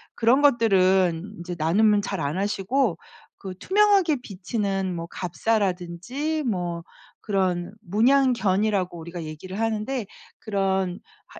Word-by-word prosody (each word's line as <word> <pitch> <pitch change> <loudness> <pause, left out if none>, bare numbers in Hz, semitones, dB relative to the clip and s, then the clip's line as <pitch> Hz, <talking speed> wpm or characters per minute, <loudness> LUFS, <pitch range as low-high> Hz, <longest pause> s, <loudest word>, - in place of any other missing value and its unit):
그런 245 +5 +3
것들은 190 - +3
이제 175 +1 -6
나눔은 205 +6 +3
잘 195 -2 -4
안 145 +5 -2
하시고 205 +1 0 0.4
그 190 -1 -7
투명하게 395 -6 +3
비치는 195 -2 -3
뭐 165 0 -5
갑사라든지 195 - -2
뭐 175 -8 -2 0.4
그런 185 -3 -1
문양 250 +8 +3
견이라고 195 -4 0
우리가 170 +1 -7
얘기를 160 +6 -7
하는데 225 +2 -1 0.3
그런 190 -3 -1 0.3
하 - - -14
195 Hz, 265 characters per minute, -24 LUFS, 180-225 Hz, 0.4 s, 그런